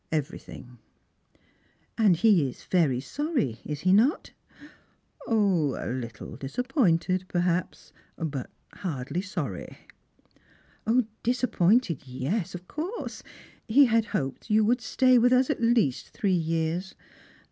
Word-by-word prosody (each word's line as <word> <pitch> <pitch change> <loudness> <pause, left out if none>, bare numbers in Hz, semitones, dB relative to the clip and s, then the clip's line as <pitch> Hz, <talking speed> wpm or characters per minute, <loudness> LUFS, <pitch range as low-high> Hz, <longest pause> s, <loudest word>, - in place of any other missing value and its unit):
" - - -43
Everything." 125 -4 -12 0.5
" - - -38
And 205 -5 +5
he 175 -6 +4
is - - -12
very 155 -9 +2
sorry, 145 - -2
is 150 -1 -5
he 185 +1 +3
not? 235 +10 +3 0.3
" 300 0 -23
" - - -20
A 230 - +1
little 145 - -1
disappointed, 185 - 0
perhaps, 175 0 -2 0.2
but 145 -5 -4 0.2
hardly 160 -1 -4
sorry." 165 - -5 0.7
" 225 -1 -3
Disappointed, 230 - +1
yes, 165 - -3
of 180 0 -9
course. 355 +10 -5 0.5
He 270 +5 +6
had 230 -2 +2
hoped 135 - -4
you 215 0 +4
would 240 +3 +2
stay 255 +3 +4
with 245 +2 +4
us 255 0 +4
at - - -3
least 230 - +2
three 205 -5 -1
years. 165 +2 -1
185 Hz, 125 wpm, -27 LUFS, 155-235 Hz, 0.7 s, He